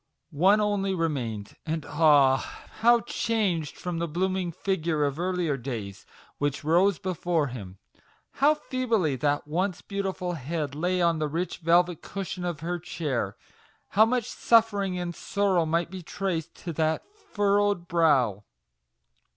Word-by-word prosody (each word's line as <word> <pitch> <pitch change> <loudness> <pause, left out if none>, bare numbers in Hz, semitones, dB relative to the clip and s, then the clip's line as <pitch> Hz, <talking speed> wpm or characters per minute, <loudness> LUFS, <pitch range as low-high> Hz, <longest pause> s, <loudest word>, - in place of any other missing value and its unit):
One 190 +8 +4
only 200 -2 0
remained, 125 - -3
and 160 -2 -3
ah! 145 -3 +5 0.4
how 235 +1 +5
changed 195 -13 -1
from 175 -2 -4
the 170 - -1
blooming 185 +2 -1
figure 165 -4 -1
of 140 +2 -2
earlier 175 -5 0
days, 115 -7 -6 0.3
which 145 -1 -1
rose 175 +4 +3
before 175 -5 -1
him! 100 -6 -8 0.6
How 300 +2 +6
feebly 230 - 0
that 145 +1 0
once 180 +4 -1
beautiful 195 -3 -3
head 150 -1 -3
lay 180 +4 0
on 170 -2 +2
the 155 - 0
rich 170 +5 -3
velvet 175 0 +3
cushion 195 -2 -5
of 175 -4 -3
her 175 +1 -2
chair! 155 -7 -3 0.5
How 215 +3 +5
much 245 -1 0
suffering 205 -7 +2
and 175 -1 -3
sorrow 190 -3 0
might 170 +2 0
be 190 -1 -6
traced 175 -1 -4
on 170 - -2
that 160 0 0
furrowed 205 - 0
brow 135 - +2
170 Hz, 140 wpm, -27 LUFS, 150-195 Hz, 0.6 s, How